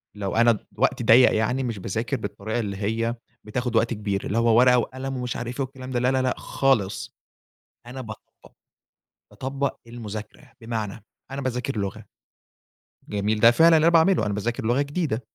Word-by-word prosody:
لو 100 -2 -3
أنا 120 +1 +5
ض 110 - -2 0.2
وقتي - - +1
ضيَّق 120 +3 +6
يعني 125 +5 0
مش 115 -5 -3
باذاكر 110 +8 -2
بالطريقة 110 +1 -4
اللي 100 -4 -3
هي 115 +3 -1 0.3
بتاخد 120 +2 -3
وقت 115 +1 +2
كبير، 105 -2 -3
اللي 105 - -2
هو 115 -1 +4
ورقة 125 0 +6
وقلم 130 +2 -3
ومش 125 -1 -3
عارف 120 +1 -5
إيه - - +1
والكلام 130 0 -10
ده 125 - 0
لا، 125 +1 +2
لا، 130 0 +1
لأ، 130 -1 +1
خالص. 110 -8 0 0.7
أنا 130 +2 -7
باطبق. 110 -3 -12 0.8
باطبق 135 +1 -3
المذاكرة. 115 +3 -8
بمعنى 110 -2 -5 0.3
أنا 135 +1 -4
باذاكر 125 0 -2
لغة، 100 -2 -4 1.1
جميل 105 +1 -1
ده 115 +2 +7
فعلًا 165 +6 +6
اللي 155 - +3
أنا 170 - +4
باعمله 165 - +4
أنا 105 - -1
باذاكر 115 +4 -3
لغة 120 +5 +2
جديدة. 145 -5 -2
120 Hz, 175 wpm, -24 LUFS, 110-130 Hz, 1.1 s, ده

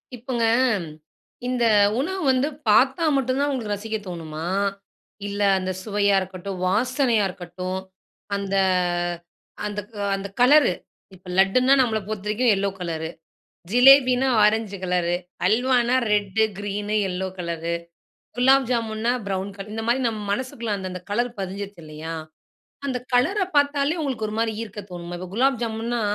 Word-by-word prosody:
இப்போங்க, 240 -1 -2 1.0
இந்த 250 -2 +1 0.3
உணவு 375 +7 -2
வந்து 260 +2 +2 0.2
பாத்தா 265 +9 +4
மட்டும் 260 0 0
தான் 290 - +1
உங்களுக்கு 225 -6 -2
ரசிக்க 220 +2 -4
தோணுமா? 165 -2 -6 0.8
இல்ல, 205 0 -4 0.2
அந்த 185 0 -2
சுவையா 205 -1 +2
இருக்கட்டும், 185 0 -6
வாசனையா 240 +1 +2
இருக்கட்டும், 185 +1 -5 0.6
அந்த 195 0 -3 1.1
அந்த 210 0 -3 0.3
அந்த 195 0 -3
கலரு, 265 -2 +6 0.4
இப்போ 180 0 -14
லட்டுன்னா 250 +8 +4
நம்மள 225 -3 +1
பொறுத்தவரைக்கும் 215 +3 +1
yellow 200 +1 0
colour, 160 -2 -3 0.6
ஜிலேபினா 255 +1 +6 0.2
orange 210 -1 +2
colour, 180 -1 +1 0.3
அல்வானா 245 +3 +3 0.2
red, 205 0 +1 0.2
green, 205 +1 -3 0.2
yellow 185 +1 -3
colour. 170 -1 -3 0.6
Gulab 265 +1 +4
ஜாமுன்னா 230 0 0 0.2
brown 195 0 -2
colour 200 +1 -8
இந்த 225 - -3
மாரி 240 +3 +2
நம்ம 220 -2 -3
மனசுக்குள்ள 235 -1 -3
அந்த, 190 -1 -5
அந்த 180 -1 -7
கலர் 240 +4 +1
பதிஞ்சிருச்சுது 195 -1 -6
இல்லையா? 155 +2 -7 0.7
அந்த 255 -2 -1
கலர்ர 375 +12 +3
பாத்தாலே 285 +2 +2
உங்களுக்கு 255 -7 -2
ஒரு 210 - -5
மாரி 225 -1 0
ஈர்க்க 210 -2 -7
தோணுமா? 175 0 -6
இப்ப 185 0 -7
குலாப் 265 0 +2
ஜாமுன்னா 230 +1 -2
215 Hz, 135 wpm, -23 LUFS, 190-250 Hz, 1.1 s, கலரு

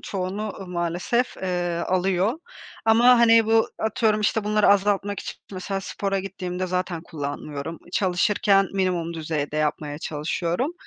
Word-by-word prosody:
çoğunu 195 +2 -3
maalesef, 180 +8 -1
eee, 175 -2 -2
alıyor 185 - +1 0.5
ama 235 +2 +6
hani 230 -1 +6
bu 225 0 +3
atıyorum, 220 0 +1
işte, 210 0 +1
bunları 210 0 +3
azaltmak 200 0 +2
için - - -6 0.2
mesela 195 +1 -3
spora 195 0 -2
gittiğimde 185 -1 -4
zaten 180 -2 -2
kullanmıyorum, 145 +1 -5
çalışırken 195 +1 +2
minimum 180 -3 -1
düzeyde 155 -2 -3
yapmaya 150 -1 -1
çalışıyorum. 170 - -2
185 Hz, 120 wpm, -24 LUFS, 170-210 Hz, 0.5 s, ama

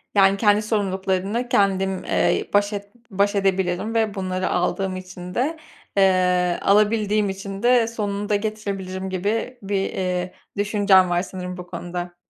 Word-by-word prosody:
Yani, 195 0 +5
kendi 210 0 +4
sorumluluklarını 200 +2 -1
kendim, 195 -2 +1
eee, - - +1
baş 205 +1 +3
et 200 0 -5 0.2
baş 200 +1 +1
edebilim 190 +2 0
ve 220 -2 +1
bunları 185 -1 -2
aldığım 185 +1 0
için 185 -1 -8
de, 295 +7 0 0.4
eee, 180 -2 +3
alabildiğim 210 0 +3
için 195 +1 -6
de 240 -2 +4
sonunu 205 -2 -3
da 205 - +3
getirebilirim 200 -3 -3
gibi 210 +7 -2
bir, 200 +1 -3 0.2
eee, 180 -1 -2 0.2
düşüncen 200 -3 +4
var 175 0 +1
sanırım 180 -1 -6
bu 180 0 -8
konuda. 175 0 -6
195 Hz, 140 wpm, -22 LUFS, 185-210 Hz, 0.4 s, Yani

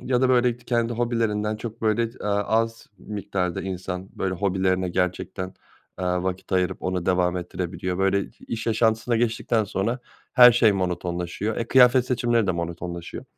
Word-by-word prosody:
ya 125 -1 0
da 130 - +3
böyle 125 -1 +3
k 120 - -22
kendi 120 -1 0
hobilerinden 110 -3 0
çok 115 +1 -8
böyle 115 +1 +1
ç - - -21
eee, - - -4
az 110 +3 0
miktarda 95 -4 -3
insan, 95 0 -5
böyle, 95 -1 -1
hobilerine 95 -1 0
gerçekten, 90 +1 -2 0.5
eee, 90 - -1 0.2
vakit 95 +1 -4
ayırıp 90 -1 0
onu 90 -1 -2
devam 90 -1 +2
ettirebiliyor. 90 +1 -4
Böyle 95 +1 +2
i - - -7 0.2
iş 115 0 -4
yaşantısına 115 +1 +2
geçtikten 115 -1 +1
sonra, 105 +5 -2 0.3
her 125 -2 +9
şey 115 -3 +4
monotonlaşıyor. 90 +2 -2
E, 115 - -3
kıyafet 125 -1 +6
seçimleri 120 -3 +1
de 90 - +2
monotonlaşıyor. 85 0 -5
105 Hz, 160 wpm, -24 LUFS, 90-115 Hz, 0.5 s, her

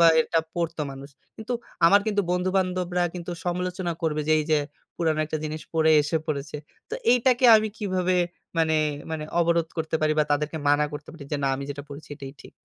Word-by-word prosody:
বা 170 - +8
এটা 165 +1 +1
পড়তো 165 -2 -2
মানুষ। 135 +1 -9 0.3
কিন্তু 220 +2 -5 0.3
আমার 200 +4 +6
কিন্তু 205 -2 +1
বন্ধু-বান্ধবরা 180 -1 0
কিন্তু 175 0 -6
সমালোচনা 180 0 -2
করবে 155 -2 0
যে - - +5
এই 155 - 0
যে, 155 - +5 0.4
"পুরানো 160 -2 +1
একটা 155 +1 -3
জিনিস 155 0 -4
পড়ে 160 0 +4
এসে 150 +3 -1
পড়েছে।" 150 -1 -3 0.3
তো - - -2 0.2
এইটাকে 250 +1 +3
আমি 215 0 +1
কিভাবে 185 -3 0 0.4
মানে, 160 -1 +3 0.3
মানে 160 -1 -3 0.2
অবরোধ 170 -1 +2
করতে 160 0 -1
পারি 155 0 +2
বা 150 - +4
তাদেরকে 150 +2 -1
মানা 145 +1 +4
করতে 145 0 -8
পারি 160 -4 -10
যে - - +2
"না, 135 - +2
আমি 140 - -5
যেটা 145 0 -6
পড়েছি 145 +2 -10
এটাই 135 -2 -8
ঠিক।" - - -14
165 Hz, 195 wpm, -25 LUFS, 150-180 Hz, 0.4 s, বা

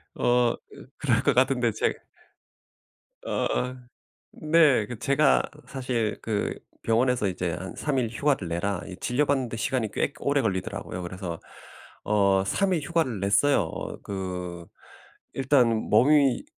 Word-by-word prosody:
어 120 -1 +2
그 - - -14
그럴 120 -4 +1
것 140 - +3
같은데 125 -2 +3
제 - - 0 1.3
어. 125 0 -1 0.6
네. 155 -8 +3
그 120 +1 -7
제가 140 +3 +3 0.3
사실 125 -5 -2
그 105 -2 -2 0.2
병원에서 120 0 +2
이제 90 -2 -2
"한 95 +4 -6
3 145 -3 -1
일 120 -3 +1
휴가를 125 - 0
내라." 85 +2 -2
이 95 - -8
진료받는데 130 -2 0
시간이 120 -1 -1
꽤 - - -1
오래 140 0 +1
걸리더라고요. 95 -2 -3
그래서 90 -1 -6 0.6
어 100 -2 +3
3 190 - +1
일 165 - 0
휴가를 145 - -1
냈어요. 105 +7 +3
어 80 - -6
그 90 -3 -5 0.7
일단 135 -2 +3 0.2
몸이 140 0 +4
120 Hz, 235 characters per minute, -26 LUFS, 100-135 Hz, 1.3 s, 몸이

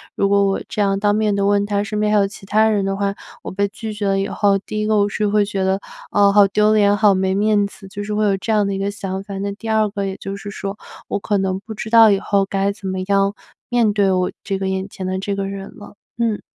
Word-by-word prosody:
如 200 - +1
果 200 0 +3
我 195 -1 0
这 215 -3 -2
样 195 -1 +1
当 205 0 +2
面 215 -1 +1
的 200 0 0
问 200 0 +3
他 205 -1 0
身 210 0 -3
边 210 0 +1
还 210 - +4
有 200 -1 +3
其 195 0 -12
他 215 +2 +3
人 210 -2 +1
的 195 0 -1
话， 200 0 0 0.3
我 - - -6
被 200 +2 0
拒 215 +2 -7
绝 205 -1 -3
了 195 0 +1
以 195 - -1
后， 200 -1 +2
第 215 +2 -5
一 215 - -1
个 215 0 +2
我 205 0 +3
是 210 +1 -1
会 205 0 +2
觉 200 -1 -2
得， 190 +1 +1 0.3
啊， 200 -1 +4
好 205 -1 +6
丢 210 +2 +3
脸， 205 -1 +4
好 210 -1 +5
没 190 0 0
面 205 0 +2
子， 200 0 -14
就 205 +2 -6
是 210 +1 -4
会 215 0 +1
有 200 -1 +2
这 205 +4 -3
样 210 -2 +3
的 200 - -1
一 - - -2
个 195 +1 -1
想 195 -2 -5
法。 200 -1 -7 0.2
第 225 - -6
二 220 -1 +3
个 200 -1 -3
也 195 0 -4
就 195 0 -6
是 205 +1 -8
说 200 0 -5 0.3
我 - - -2
可 205 +1 0
能 190 -1 -1
不 220 +3 -9
知 215 - -6
道 225 -1 +8
以 200 -1 +3
后 200 -1 +1
该 195 +1 0
怎 200 -1 -8
么 190 0 -2
样 200 0 +2 0.4
面 235 -4 +2
对 200 -1 +2 0.4
这 195 -1 -2
个 190 - -3
我 - - 0
眼 190 +1 -3
前 190 - -7
的 185 0 -2
这 200 +1 -2
个 195 0 -2
人 195 0 -7
了。 210 -1 -12 0.2
嗯。 230 -3 0
200 Hz, 310 characters per minute, -20 LUFS, 195-210 Hz, 0.4 s, 道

